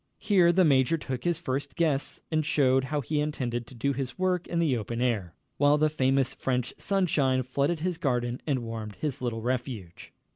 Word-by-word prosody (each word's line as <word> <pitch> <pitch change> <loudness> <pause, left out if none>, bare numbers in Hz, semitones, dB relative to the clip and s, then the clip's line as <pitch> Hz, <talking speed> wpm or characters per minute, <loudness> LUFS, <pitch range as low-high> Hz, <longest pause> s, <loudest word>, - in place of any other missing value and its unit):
Here 190 -5 +4
the 180 +1 +4
major 140 +2 +3
took 130 -5 -5
his 175 -2 +2
first 140 -3 -3
guests 155 -5 0
and 155 -1 +2
showed 135 -3 +2
how 145 +2 -1
he 150 +4 -1
intended 125 -6 -2
to 130 - -12
do 140 +4 0
his 130 -2 -4
work 185 -1 0
in 170 - -3
the 160 -6 +2
open 115 +1 -4
air, 105 - -1 0.2
while 145 +1 +4
the 155 0 +2
famous 135 -2 +1
French 125 -2 -2
sunshine 145 -10 +1
flooded 140 +6 -1
his 180 -1 -2
garden 125 -5 -1
and 135 -5 0
warmed 110 -2 -6
his 145 -3 -3
little 115 -3 -3
refuge. 120 -8 -4
135 Hz, 190 wpm, -28 LUFS, 125-155 Hz, 0.2 s, Here